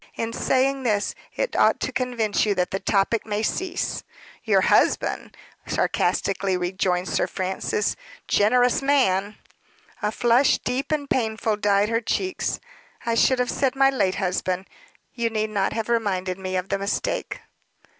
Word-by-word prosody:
In 230 0 -3
saying 270 +3 +1
this, 210 -5 0 0.2
it - - -2
ought - - +4
to - - -1
convince 245 -4 0
you 205 -2 +1
that 180 -1 0
the 195 - -1
topic 200 +3 +1
may 210 0 -2
cease." 360 +9 -2 0.4
"Your - - +3
husband!" - - +1 0.3
sarcastically 195 -1 0
rejoined 180 0 -1
Sir - - 0
Francis. 190 +2 -2 0.3
"Generous 245 +5 +3
man!" 210 -8 +2 0.6
A 210 - 0
flush, 240 +4 +3
deep 255 +5 -3
and 295 -2 -1
painful, 220 -4 0
dyed 205 0 +2
her 230 0 +1
cheeks. 370 - -2 0.5
"I 230 - +1
should 255 +3 +3
have 250 -1 0
said 270 -1 0
my 270 0 +4
late 190 -8 +1
husband. 185 -1 -1 0.5
You 235 -1 -1
need 215 -1 -2
not 200 -2 0
have 225 -1 -3
reminded 195 -5 -1
me 185 0 -4
of 185 +1 -2
the 195 - 0
mistake." 205 - -2
215 Hz, 150 wpm, -24 LUFS, 195-250 Hz, 0.6 s, ought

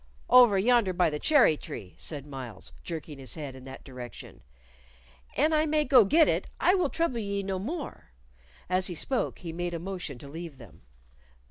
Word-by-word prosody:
"Over 245 -5 +8
yonder 225 -2 +3
by 175 -3 +2
the 150 - -3
cherry 280 - +5
tree," 100 -9 -8
said 145 -3 -5
Myles, 130 -8 -8
jerking 155 -4 -6
his 130 -4 -6
head 145 -4 -6
in 130 0 -12
that 135 0 -10
direction. 125 - -10 1.0
"An 315 +1 +3
I 310 0 +3
may 305 0 +2
go 250 -7 +7
get 315 +9 +5
it, - - 0
I 360 - +4
will 370 -2 +2
trouble 330 -8 -1
ye 200 -2 -2
no 190 -1 -2
more." 285 - -6 0.6
As 185 0 +2
he 175 - -3
spoke 260 - -2
he 170 -3 -7
made 175 0 -3
a - - -3
motion 180 -6 -5
to 140 - -11
leave 160 0 -8
them. 115 -4 -15
180 Hz, 190 wpm, -28 LUFS, -, 1.0 s, Over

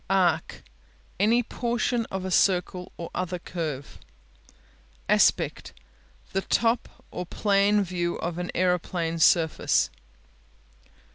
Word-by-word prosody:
Arc 175 -4 +1 0.6
Any 230 +5 +3
portion 235 0 -1
of 190 -1 -4
a 190 - -3
circle 180 -1 +1
or 170 - -7
other 180 0 -2
curve. 155 -6 -5 1.1
Aspect - - +2 0.6
The 195 - +1
top 230 +4 0
or 180 - -5
plan 205 +1 +2
view 175 -2 -2
of 175 0 -4
an 180 - -4
aeroplane 175 -2 0
surface. 160 -1 +3
180 Hz, 100 wpm, -26 LUFS, 170-200 Hz, 1.1 s, Any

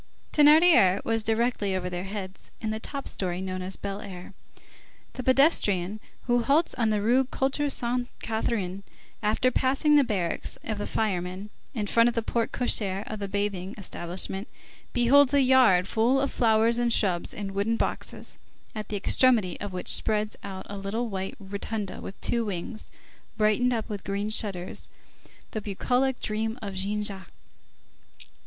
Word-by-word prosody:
Thénardier 295 - +6
was 225 0 +1
directly 220 -3 0
over 180 -1 -2
their 180 +1 -4
heads 195 -1 -7
in 220 - -3
the 220 - -3
top 275 +4 -5
story 180 -2 -1
known 185 -1 -4
as 185 +1 -3
Fine 200 0 -5
Air. 180 +1 -10 0.8
The 255 - -5
pedestrian 215 - +3 0.3
who 245 -1 +2
halts 290 +7 +2
on 230 -3 +1
the 210 -1 0
Rue 250 +4 +3
Culture 270 +3 0
Sainte 245 -1 -1
Catherine, 205 -4 -2 0.4
after 220 +4 +2
passing 270 +4 +2
the 285 - +6
barracks 195 -8 -2
of 215 -2 -3
the - - -3
firemen, 190 -1 -2 0.2
in 215 -3 -1
front 230 +3 +4
of 240 - -5
the 230 - 0
porte 230 0 -1
cochère 200 -5 0
of 215 - -6
the 200 - -3
bathing 200 -1 -2
establishment, 190 +1 -4 0.4
beholds 270 +3 +5
a 280 - +5
yard 250 -9 +5
full 235 +6 +2
of 275 0 0
flowers 225 0 +3
and 240 -1 +1
shrubs 185 -6 +1
in 195 -2 -5
wooden 205 +4 0
boxes, - - -3 0.4
at 215 -1 -5
the 210 - -3
extremity 215 -3 +3
of 205 - -5
which 180 0 -6
spreads 215 0 0
out 190 -1 -7
a 200 0 -6
little 220 +5 -2
white 190 -1 -4
rotunda 200 +1 -5
with 195 - -8
two 235 -1 0
wings, 205 +2 -5 0.5
brightened 215 +3 +3
up 225 -3 -2
with 205 -2 -6
green 200 +2 -2
shutters, 195 -5 -2 0.6
the 215 - -3
bucolic 245 +6 0
dream 220 +2 -2
of 200 -4 -6
Jean 200 +2 -2
Jacques. 195 -2 -3
215 Hz, 160 wpm, -27 LUFS, 195-240 Hz, 0.8 s, Thénardier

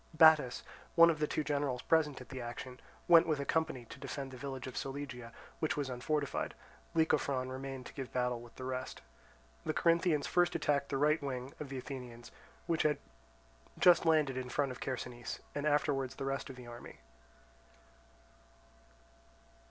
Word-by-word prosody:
Battus, 155 -6 +6 0.3
one 170 -1 +8
of 155 - -4
the 150 - +1
two 155 - -1
generals 140 -4 -1
present 155 -4 +2
at 125 - -12
the 130 -2 -5
action, 125 +2 -7 0.3
went 170 -1 +8
with 155 -3 +1
a 140 - -2
company 160 -7 0
to - - -11
defend 135 -2 -5
the - - -8
village 135 -1 -5
of 130 - -7
Solygia, 135 -4 -5 0.3
which 155 - 0
was 140 -3 -1
unfortified; 140 +3 -1 0.4
Lycophron 140 -5 +2
remaining 135 0 -5
to - - -10
give 135 -3 -6
battle 125 -1 0
with 120 -1 -14
the 130 - -8
rest. 130 0 -4 0.6
The 155 - -2
Corinthians 170 -3 +3
first 175 -1 +2
attacked 140 -1 +1
the 140 - 0
right 150 +3 +3
wing 130 -1 -4
of 150 - -6
the 135 - -4
Athenians, 125 -3 -7 0.3
which 165 -1 +1
had 150 -2 +3 0.8
just 175 -1 +6
landed 155 -5 +3
in 130 -1 -3
front 140 0 0
of 125 - -8
Chersonese, 120 -2 -4
and 145 +1 -1
afterwards 140 -3 +1
the 135 - -4
rest 135 0 -2
of 135 - -7
the 125 -1 -10
army. 120 0 -10
135 Hz, 170 wpm, -34 LUFS, 125-150 Hz, 0.8 s, one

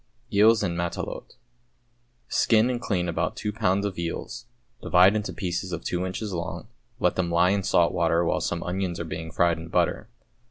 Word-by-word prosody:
=Eels, 110 +2 +5
en 85 -3 -1
Matelote.= 85 0 -4 0.9
Skin 115 +2 +3
and 120 -1 -3
clean 90 -6 -1
about 85 - -1
two 105 -1 -3
pounds 100 -2 +1
of 95 -4 -4
eels, 85 +7 -5 0.3
divide 90 +3 +5
into 105 -1 -2
pieces 90 -1 -3
of 85 -1 -4
two 90 0 -2
inches 100 +2 -4
long, 85 -1 -5 0.3
let - - +2
them 90 -2 0
lie 85 +2 +3
in 100 0 +1
salt 85 -2 +2
water 85 0 +2
while - - 0
some 85 - -2
onions 90 -1 -3
are 85 - -3
being 80 0 -6
fried 85 0 +1
in 80 - -8
butter. 90 +5 0
90 Hz, 185 wpm, -25 LUFS, 85-100 Hz, 0.9 s, =Eels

